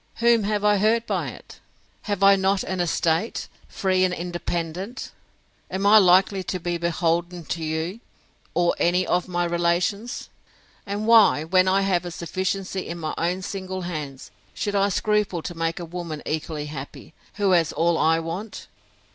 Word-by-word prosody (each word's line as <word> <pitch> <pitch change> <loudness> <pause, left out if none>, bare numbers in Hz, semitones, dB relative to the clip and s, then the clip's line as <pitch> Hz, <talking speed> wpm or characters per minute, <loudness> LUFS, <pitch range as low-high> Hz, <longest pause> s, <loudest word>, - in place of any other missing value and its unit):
Whom 235 -2 +3
have 210 0 0
I 210 0 +4
hurt 225 +3 +2
by - - -1
it?—Have 205 -2 -8
I 195 0 +8
not 195 0 +1
an 190 -1 -3
estate, 170 +3 0 0.2
free 185 -1 +1
and 185 - +2
independent?—Am 175 +3 -6
I 215 +2 +8
likely 190 +1 +4
to 185 0 -4
be 175 0 -2
beholden 170 0 -1
to 165 +1 -4
you, 160 +6 -3 0.6
or 175 0 +3
any 180 +2 +2
of 180 +1 0
my 175 -1 -1
relations? 175 +6 -1 0.6
And 205 +2 -3
why, 220 -9 +6
when 185 +3 +3
I 190 +1 +3
have 185 -3 +1
a 175 - -5
sufficiency 185 +2 -3
in 170 - -5
my 155 -2 -4
own 180 +3 -1
single 185 -1 -5
hands, 150 -6 -6 0.2
should 205 - -2
I 200 0 +2
scruple 205 -4 0
to - - -5
make 165 0 -2
a 175 - -5
woman 165 -3 -6
equally 155 -1 -3
happy, 145 +1 -9 0.2
who 200 -2 +1
has 170 -4 +3
all 170 +1 +1
I 160 +1 +3
want? 175 +7 -5
180 Hz, 160 wpm, -24 LUFS, 170-195 Hz, 0.6 s, I